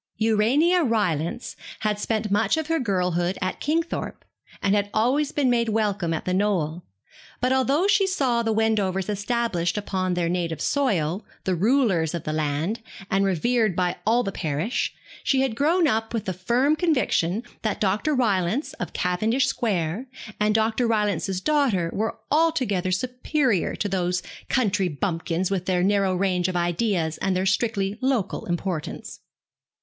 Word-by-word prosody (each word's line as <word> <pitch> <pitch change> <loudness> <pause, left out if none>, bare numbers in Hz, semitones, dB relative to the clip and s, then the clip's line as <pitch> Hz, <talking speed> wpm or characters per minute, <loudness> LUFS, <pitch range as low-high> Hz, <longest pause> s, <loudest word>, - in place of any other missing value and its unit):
Urania 240 +12 +3
Rylance 205 - -1 0.3
had 210 -1 0
spent 215 -1 -1
much 210 +5 +2
of 315 - -1
her 325 +1 0
girlhood 180 - 0
at 185 -1 -2
Kingthorpe, 330 +3 -2 0.3
and 195 - +1
had 205 -1 +1
always 270 +7 +2
been 285 -3 +1
made 235 -2 +2
welcome 205 -5 0
at 160 - -2
The 185 - 0
Knoll; 180 -5 0 0.6
but 255 +1 +2
although 270 +6 +2
she 405 -1 +3
saw 265 -11 +1
the 225 -1 0
Wendovers 210 -4 +1
established 205 -4 -1
upon 185 -3 -1
their 175 -1 0
native 170 -2 -2
soil, 195 - 0 0.2
the 190 - 0
rulers 190 - +2
of 170 - -4
the 155 - -3
land, 155 +8 -1 0.3
and 195 +1 +3
revered 215 +2 +1
by 180 -1 0
all 235 +3 +3
the 195 - -3
parish, 160 - -2 0.3
she 265 -1 +2
had 265 -4 0
grown 325 +6 +3
up 225 -2 -1
with 220 - -2
the 185 - -2
firm 240 - +2
conviction 250 - +1 0.2
that 215 -2 -2
Dr. 210 +9 +1
Rylance, 215 - 0
of 180 - -4
Cavendish 215 +9 +1
Square, 195 +1 -1 0.3
and 210 0 +2
Dr. 225 +2 +2
Rylance's 205 -4 0
daughter 235 - +1
were 220 +2 -2
altogether 265 - +2
superior 250 - 0
to 205 - -2
these 180 -2 -1 0.3
country 200 -6 +1
bumpkins, 170 +2 -2
with 185 -2 -2
their 180 -1 +2
narrow 195 -1 +2
range 180 -1 +1
of 185 - -3
ideas 175 -1 0
and 190 -1 0
their 185 +1 0
strictly 200 +1 0
local 255 -7 -1
importance. 175 -2 -4
205 Hz, 155 wpm, -24 LUFS, 180-245 Hz, 0.6 s, Urania